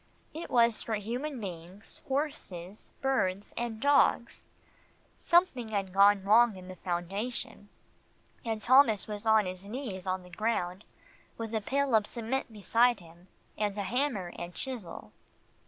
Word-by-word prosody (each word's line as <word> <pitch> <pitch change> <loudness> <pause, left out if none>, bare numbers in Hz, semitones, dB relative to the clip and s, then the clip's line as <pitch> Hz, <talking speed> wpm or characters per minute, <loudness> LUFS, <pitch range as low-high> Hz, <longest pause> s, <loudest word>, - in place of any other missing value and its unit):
It 325 +2 -6
was 235 -2 +3
for 225 - -1
human 245 +7 -4
beings, 185 +1 -5
horses, 215 - -4
birds 205 -7 0
and 235 -2 -3
dogs. 280 -3 +2 0.7
Something 340 -9 +2
had 195 -3 -2
gone 200 0 +5
wrong 220 +1 +5
in 185 0 -11
the 185 - -7
foundation, 195 +5 -4 0.7
and 220 -2 -3
Thomas 245 -5 +5
was 210 +1 -5
on 220 -2 +5
his 185 +1 -6
knees 210 -5 -6
on 185 0 -1
the 180 - -15
ground, 190 -2 -2 0.5
with 225 -1 -5
a 220 - 0
pail 275 +4 0
of 215 -2 +4
cement 235 +2 -3
beside 230 +3 +2
him, 170 +1 -17 0.3
and 210 -1 -1
a 200 - -1
hammer 215 -4 -1
and 175 +1 -7
chisel. 235 -11 -6
215 Hz, 140 wpm, -30 LUFS, 190-240 Hz, 0.7 s, gone